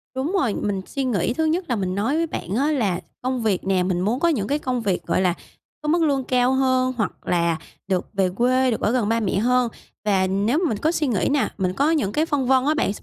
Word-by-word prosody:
Đúng 275 +7 -1
rồi, 225 - +1
mình 195 -2 -2
suy 275 -2 -3
nghĩ 230 -3 0
thứ 320 - 0
nhất 340 +3 0
là 245 - +1
mình 185 -3 -2
nói 225 +9 0
với 330 0 +1
bạn 195 - -4
á, 285 +5 +2
là 205 - 0 0.2
công 255 0 -1
việc 200 -4 0
nè, 185 -2 +2
mình 180 -1 0
muốn 220 +7 0
có 340 - +2
những 220 -11 0
cái 290 +2 0
công 250 -3 -2
việc, 195 -4 -1
gọi - - +1
là, 180 -2 +2 0.5
có 300 - -5
mức 340 +2 +3
lương 275 -3 +1
cao 250 0 +2
hơn 255 -1 +2
hoặc 205 -5 0 0.2
là 170 -2 +1 0.3
được 185 -2 0
về 195 -2 +1
quê, 250 +6 +2
được - - -2
ở 210 - +2
gần 235 -4 +1
ba 230 - +2
mẹ 195 -3 -1
hơn. 250 +2 +2 0.4
Và 190 -2 +2
nếu 205 +9 +1
mình 220 - -1
có 315 +9 +1
suy 315 -3 0
nghĩ 215 -7 +1
nè, 290 - +1
mình 185 -2 0
có 290 +9 +2
những 275 -11 +1
cái 305 +7 +1
phân 285 -5 -1
vân 260 -1 +4
á 300 - +3
bạn, 210 -9 0
s - - -11
245 Hz, 265 wpm, -22 LUFS, 195-275 Hz, 0.5 s, vân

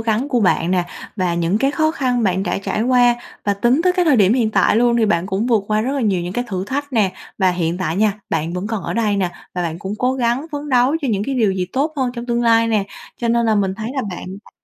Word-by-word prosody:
gắng 225 +5 0
của 245 -4 +1
bạn 180 -3 +2
nè 180 -1 +1 0.3
và 180 -3 0
những 170 +4 0
cái 270 +4 +2
khó 315 +1 +1
khăn 250 -6 0
bạn 190 -1 +1
đã - - -1
trải 195 +2 -2
qua, 245 -1 +4 0.3
và 200 -1 +1
tính 240 +9 +2
tới 365 - +4
cái 360 -1 +1
thời 290 -6 +4
điểm 205 +2 +4
hiện 230 -4 +1
tại 215 - +3
luôn 235 0 +3
thì 225 -2 +3
bạn 170 -3 +1
cũng 195 +5 -1
vượt 225 -5 +2
qua 215 0 +2
rất 260 +5 -1
là 280 - -1
nhiều 200 -6 +1
những 175 - -4
cái 245 +5 -2
thử 185 -2 -3
thách 285 +5 -4
nè. 205 -5 +2 0.3
Và 190 -2 +3
hiện 175 0 -1
tại 170 -2 -2
nha, 210 0 +3 0.2
bạn 165 +1 -1
vẫn 180 +3 -3
còn 220 -3 -3
ở - - -4
đây 215 -3 +1
nè, 185 -3 0 0.2
và 180 - -1
bạn 165 0 -3
cũng 195 +3 -5
cố 250 +1 +1
gắng 250 +3 0
phấn 290 0 -5
đấu 255 +4 +3
cho 275 - -1
những 205 -3 0
cái 275 - -2
điều 215 -6 +2
gì 185 -1 -2
tốt 290 +4 0
hơn 255 -2 0
trong 235 0 -6
tương 240 0 0
lai 230 0 +4
nè, 210 -3 +1 0.3
cho 235 - -2
nên 235 0 +2
là 220 - +3
mình 195 -2 0
thấy 220 +3 -5
là 265 - -1
bạn 180 - -7 0.2
đã - - -18
220 Hz, 290 wpm, -19 LUFS, 190-250 Hz, 0.3 s, qua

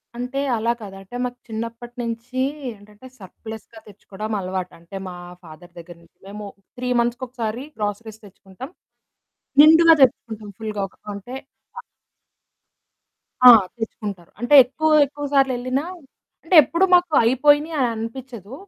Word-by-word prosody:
అంటే, 250 +3 -4 0.2
అలా 230 +2 0
కాదు. 195 -2 -9
అంటే 195 +6 -13
మాకు 245 0 -6
చిన్నప్పటనించీ 235 +2 -5 0.3
ఏంటంటే, 210 +4 -17
సర్‌ప్లస్‌గా 220 +3 -11
తెచ్చుకోడం 210 +1 -7
అలవాటు. 185 -1 -5
అంటే, 170 +4 -13
మా 180 - -8 0.3
ఫాదర్ 170 +2 -14
దగ్గర 170 0 -12
నుంచి. - - -27
మేము 210 +1 -8 0.3
3 250 0 -4
మంత్స్‌కొకసారి 240 0 -4
గ్రోసరీస్ 215 +1 -5
తెచ్చుకుంటాం. 200 +5 -12 0.9
నిండుగా 325 +2 +7
తెచ్చుకుంటాం, 220 -4 -1
ఫుల్‌గా 210 -2 -3 0.2
కొంటే 205 +4 -8 0.4
వా - - -7 1.6
ఆ! - - +13 0.3
తెచ్చుకుంటారు. 205 -6 -7
అంటే, 240 +4 -1
ఎక్కువ 310 +5 -1
ఎక్కువ 290 +1 -7
సార్లెళ్ళినా 260 0 +1 0.6
అంటే, 340 +2 0
ఎప్పుడు 335 +7 +1
మాకు 355 -2 +1
అయిపోయినియి 290 +6 +2
అననిపిచ్చదు. 230 -1 -5
230 Hz, 115 wpm, -21 LUFS, 205-255 Hz, 1.6 s, ఆ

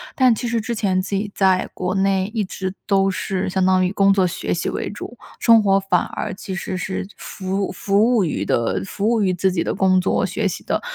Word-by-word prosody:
但 255 -3 +5
其 230 - -5
实 230 -1 0
之 235 +2 -3
前 190 -4 +1
自 190 - -8
己 205 +1 -2
在 190 -1 +2
国 185 +1 -2
内 195 0 +1
一 220 -3 0
直 185 0 -5
都 195 -1 +3
是 190 0 -2
相 185 0 +1
当 185 0 +3
于 - - -3
工 195 0 +4
作 190 -2 +3
学 175 - -3
习 170 - -2
为 - - -3
主， 220 +3 -8 0.2
生 230 -2 +6
活 195 -1 +4
反 195 -2 +1
而 - - -4
其 190 0 -7
实 190 0 -4
是 190 +1 -4
服 195 0 -3
服 205 +6 +2
务 205 - +3
于 145 - -2
的 95 -4 0
服 205 - -1
务 230 -2 +2
于 185 -2 +2
自 185 +2 +1
己 165 - 0
的 - - -2
工 185 -1 +3
作 180 - +1
学 - - -1
习 - - -6
的。 - - -1
195 Hz, 250 characters per minute, -21 LUFS, 185-205 Hz, 0.2 s, 生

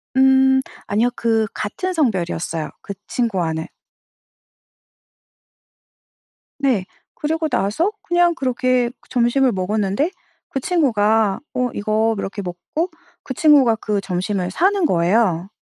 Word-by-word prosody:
음. 265 0 +5 0.3
아니요. 220 +4 +2
그 225 -2 +1
같은 365 - -3
성별이었어요 175 - -1
그 200 - -6
친구와는. 175 -9 -1 2.9
네. 250 -9 +1 0.3
그리고 320 +1 -1
나서 245 - 0
그냥 345 -1 +2
그렇게 255 -3 +1 0.2
점심을 250 +1 +2
먹었는데 205 - 0 0.4
그 270 - -2
친구가 220 - +2
어 250 0 0
이거 215 +2 +1
이렇게 200 +1 -4
먹고 190 - -4 0.3
그 260 - -5
친구가 275 -6 +5
그 210 -3 -2
점심을 185 0 -2
사는 380 - +2
거예요. 180 - +2
230 Hz, 235 characters per minute, -20 LUFS, 195-270 Hz, 2.9 s, 음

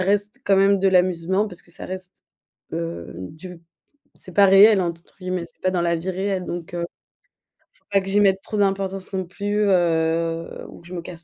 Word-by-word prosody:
reste 205 +2 0
quand 195 - +4
même 195 +1 +4
de 195 - +4
l'amusement, 185 +2 +2
parce 180 -4 -9
que - - -19
ça 170 - -8
reste, 185 -1 -8 0.5
heu, 85 0 -4
du 155 - -9 0.6
c'est 185 - -13
pas 200 +2 +6
«réel», 195 +1 +7
entre 170 -1 -5
guillemets, 185 -2 -3
c'est 165 - -20
pas 185 - +2
dans 180 -2 0
la 170 0 +1
vie 170 +3 -4
réelle 190 0 -1
donc 175 -1 -6
heu 170 -1 -2 1.1
il 200 - +3
faut - - +6
pas - - -9
que 190 - -4
j'y 205 - +4
mette 195 -2 +3
trop 210 - -5
d'importance 195 -1 -1
non 190 -1 -1
plus, 205 +4 -2
heu, 165 -2 0
ou - - -13
que 170 - -15
je 180 - -9
me 175 - -4
casse 170 0 -7
185 Hz, 215 wpm, -22 LUFS, 170-195 Hz, 1.1 s, réel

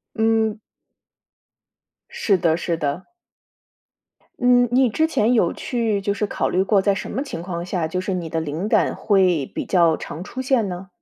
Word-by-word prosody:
嗯。 220 -1 +1 1.5
是 195 -4 +1
的 165 -2 +1
是 170 0 -2
的。 150 +3 -3 1.3
嗯， 245 0 +4
你 255 0 +4
之 315 +8 +1
前 240 -7 +1
有 185 -8 +2
去 225 -5 -1
就 200 +1 -1
是 210 - -1
考 - - -2
虑 185 - +2
过， 195 0 +3
在 200 0 +2
什 - - -6
么 265 - -2
情 220 - -6
况 175 -2 -4
下， 175 -3 -2
就 180 +3 -3
是 190 +1 -3
你 170 -3 -4
的 165 - -1
灵 160 +6 -3
感 - - +2
会 185 -8 +2
比 - - -3
较 170 -4 +3
常 160 +3 -7
出 260 - -6
现 255 -5 +1
呢？ 180 +1 -6
195 Hz, 190 characters per minute, -22 LUFS, 170-225 Hz, 1.5 s, 嗯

